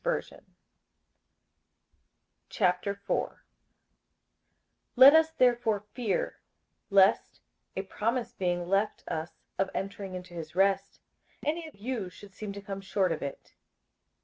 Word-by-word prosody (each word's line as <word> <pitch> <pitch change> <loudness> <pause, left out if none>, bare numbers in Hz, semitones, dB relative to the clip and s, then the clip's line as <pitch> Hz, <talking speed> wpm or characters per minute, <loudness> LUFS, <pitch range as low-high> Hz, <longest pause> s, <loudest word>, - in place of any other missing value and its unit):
58:004:001 200 +1 0 1.6
Let 260 +3 +10
us 320 0 +6
therefore 240 -6 +3
fear, 225 -7 -1 0.5
lest, 195 -1 +4 0.4
a 190 - -2
promise 230 +5 -2
being 175 -2 -1
left 200 +3 +1
us 160 0 -3 0.3
of 195 0 +2
entering 195 -1 -4
into 180 -1 -8
his 165 -1 -7
rest, 195 +1 +1 0.4
any 320 +2 -1
of 310 - -13
you 215 -2 -3
should 200 +2 -14
seem 210 0 -6
to 200 0 -7
come 195 -1 -5
short 190 -1 +1
of 160 - -2
it. 140 - -7
200 Hz, 110 wpm, -29 LUFS, 185-225 Hz, 1.6 s, Let